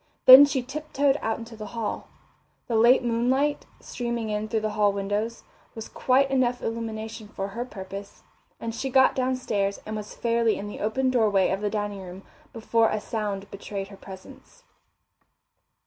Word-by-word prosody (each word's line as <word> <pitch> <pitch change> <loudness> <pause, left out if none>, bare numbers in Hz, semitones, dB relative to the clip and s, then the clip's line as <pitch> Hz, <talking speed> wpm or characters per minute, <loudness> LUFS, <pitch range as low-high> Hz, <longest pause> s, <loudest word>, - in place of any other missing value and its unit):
Then 260 +2 +11
she 275 -3 -2
tip 305 +4 -8
toed 280 0 +2
out 225 0 -1
into 230 0 -10
the 215 -1 -8
hall. 220 -2 -3 0.6
The 235 - -3
late 240 +4 +5
moonlight, 255 +5 0
streaming 235 -2 -4
in 210 +1 -2
through 220 0 -1
the 215 0 -2
hall 210 -1 +2
windows, 205 +3 -3 0.3
was 225 -1 -7
quite 270 +1 +2
enough 250 -2 +1
illumination 220 -1 -5
for 195 -1 -5
her 235 +5 -5
purpose, 200 -3 -9 0.4
and 230 0 -4
she 265 +4 -3
got 265 +1 +5
downstairs 250 -6 -1
and 215 - -5
was 210 -1 -7
fairly 230 -1 +1
in 205 - -6
the 205 - -8
open 255 +5 0
doorway 210 -6 +2
of 190 +1 -2
the 210 - 0
dining 205 -2 -3
room 185 +1 -10 0.3
before 230 0 +1
a 215 - -1
sound 205 -3 -4
betrayed 200 -1 -6
her 200 - -11
presence. 190 - -13
225 Hz, 170 wpm, -25 LUFS, 205-245 Hz, 0.6 s, Then